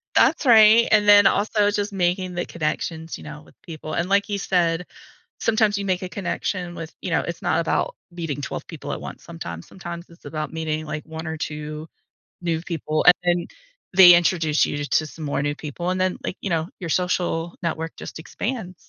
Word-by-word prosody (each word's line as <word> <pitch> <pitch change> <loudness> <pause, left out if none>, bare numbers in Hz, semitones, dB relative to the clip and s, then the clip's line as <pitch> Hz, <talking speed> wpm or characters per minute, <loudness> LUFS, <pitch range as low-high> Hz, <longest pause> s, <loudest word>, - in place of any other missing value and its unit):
That's 315 - +4
right, 225 -1 +7
and 210 -1 +4
then 205 -1 +8
also 205 0 +2
just 205 0 -2
making 180 0 0
the 175 - -2
connections, 160 0 -3
you - - -12
know, 150 0 -9
with - - -21
people, 155 -2 -8
and 175 +2 -1
like 200 0 +3
you 205 -1 -2
said, 175 -2 +1 0.5
sometimes 215 -2 +2
you 200 - -3
make 185 0 0
a 185 - -3
connection 175 -1 -3
with 165 -1 -8
you - - -4
know, - - +2
it's - - -5
not - - +2
about - - -1
meeting 165 -5 -4
12 - - -5
people - - -7
at - - -4
once. - - -9
Sometimes 85 0 -7
sometimes 175 -2 -8
it's 170 - -19
about 155 -1 -4
meeting 155 -1 -2
like 155 0 -5
1 160 +1 -7
or 160 0 -3
2 150 0 -5 0.5
new 165 -2 -1
people 155 -3 -2
and 180 - +10
then 175 -1 +1 0.5
they 180 -2 +10
introduce 165 -3 +3
you 145 - -3
t 145 - -3
to 155 - +1
some 155 +1 -9
more 140 -1 -1
new 145 0 0
people, 160 +4 -4
and 185 0 -1
then, 185 0 +1
like, - - -3
you 200 - -3
know, 165 -2 0
your 170 - -4
social 175 -1 0
network 165 -1 -3
just - - -8
expands. 200 +2 -4
175 Hz, 205 wpm, -23 LUFS, 160-190 Hz, 0.5 s, and